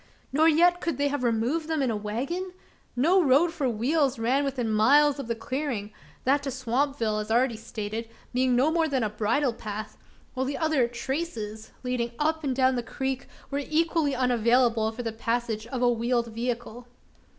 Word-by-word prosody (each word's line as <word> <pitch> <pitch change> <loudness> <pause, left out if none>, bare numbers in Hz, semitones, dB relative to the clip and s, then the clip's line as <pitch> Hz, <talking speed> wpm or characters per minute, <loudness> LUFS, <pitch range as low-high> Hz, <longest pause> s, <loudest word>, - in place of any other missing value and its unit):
Nor 310 +3 +5
yet 350 +3 +4
could 335 - -2
they 285 0 +1
have 285 -2 -2
removed 245 +7 0
them 315 -3 0
in 255 - +1
a - - -1
wagon? 270 - -3 0.4
No 335 +10 +4
road 315 +3 +4
for 290 -6 0
wheels 265 +5 +1
ran 250 +5 +1
within 260 -4 -2
miles 275 +7 +4
of 275 - -5
the 235 - -1
clearing 230 -4 -3 0.3
that 280 +3 +3
to 280 - -3
Swampville, 255 -3 -1
as 210 - -7
already 240 +1 +2
stated, 220 0 -5 0.2
being 255 0 +2
no 270 +6 +3
more 325 -1 +2
than 265 -5 0
a 215 - -1
bridle 230 +5 +1
path; 215 -1 -7 0.3
while 260 0 -1
the 280 0 -2
other 310 -6 +2
"traces," 235 -4 -4
leading 245 -2 -2
up 315 +1 0
and 265 -3 -1
down 260 0 +3
the 245 - 0
creek, 265 +2 -4 0.2
were 280 - 0
equally 310 -2 +1
unavailable 240 -2 +2
for 235 +2 -6
the 225 - -2
passage 230 -1 -2
of 250 0 -3
a 245 - +5
wheeled 235 0 0
vehicle. 240 0 -4
255 Hz, 185 wpm, -27 LUFS, 230-285 Hz, 0.4 s, Nor